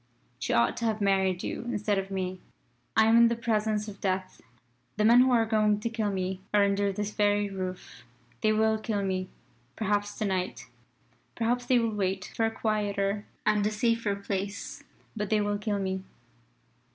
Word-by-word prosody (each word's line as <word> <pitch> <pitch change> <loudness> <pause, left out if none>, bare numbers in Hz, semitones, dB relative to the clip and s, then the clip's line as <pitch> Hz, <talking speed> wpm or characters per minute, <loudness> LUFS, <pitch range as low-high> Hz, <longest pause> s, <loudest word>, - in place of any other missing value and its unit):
She - - -2
ought 115 0 +3
to 235 - -2
have 220 -1 0
married 190 -2 +1
you - - -3
instead 210 -4 0
of 195 0 -5
me. 185 -1 -3 0.6
"I 220 - +7
am 225 +1 +5
in 235 0 +7
the 235 - +1
presence 215 -2 0
of 200 -2 -9
Death. 185 -1 -2 0.6
The 210 - +2
men 235 +2 +7
who 255 +1 +5
are 235 -3 +4
going 215 -2 +2
to 230 - -2
kill 220 -2 -1
me 190 -1 -3
are 205 - +6
under 200 0 +1
this 210 +1 -3
very 205 -1 +1
roof. 185 -9 -6 0.4
They 215 - +3
will 220 0 +2
kill 215 -2 -2
me, 185 -1 -2 0.5
perhaps 205 -1 -1
to 215 - -1
night. 185 -2 -2 0.7
Perhaps 245 +1 0
they 255 - +4
will 230 -2 +1
wait 190 -2 -2
for 225 - +2
a - - 0
quieter 205 -2 -1 0.2
and 210 -1 +3
a - - -1
safer 230 -1 +1
place. 200 0 -4 0.3
But 210 -2 -3
they 215 - +3
will 205 0 0
kill 210 -1 -1
me. 190 -1 -2
205 Hz, 185 wpm, -28 LUFS, 195-220 Hz, 0.7 s, I